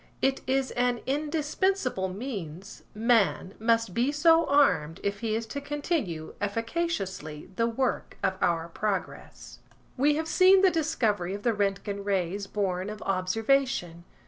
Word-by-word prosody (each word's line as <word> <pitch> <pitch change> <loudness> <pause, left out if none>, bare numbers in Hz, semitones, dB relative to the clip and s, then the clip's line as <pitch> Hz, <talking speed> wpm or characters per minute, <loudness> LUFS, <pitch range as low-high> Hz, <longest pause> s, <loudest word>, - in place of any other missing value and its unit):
It 270 0 +1
is 265 0 +1
an 245 -1 0
indispensable 300 - 0
means–man 200 - -1
must 230 -3 +1
be 245 +7 +1
so 325 +2 +4
armed 170 - +3
if 200 0 -2
he 225 -2 -1
is 225 0 -2
to 280 - -3
continue 285 - -3
efficaciously 205 - -3
the 230 +3 +1
work 245 +2 -2
of 190 - +2
our 165 -1 +1
progress. 195 +2 -4 0.4
We 290 +3 +3
have 315 +1 -2
seen 375 +3 +5
the 380 - +6
discovery 220 - 0
of 205 - -8
the 235 - +2
Roentgen 200 0 -2
Rays 195 0 -1
born 190 -2 -2
of 215 +1 -7
observation. 195 -1 0
225 Hz, 135 wpm, -28 LUFS, 190-280 Hz, 0.4 s, the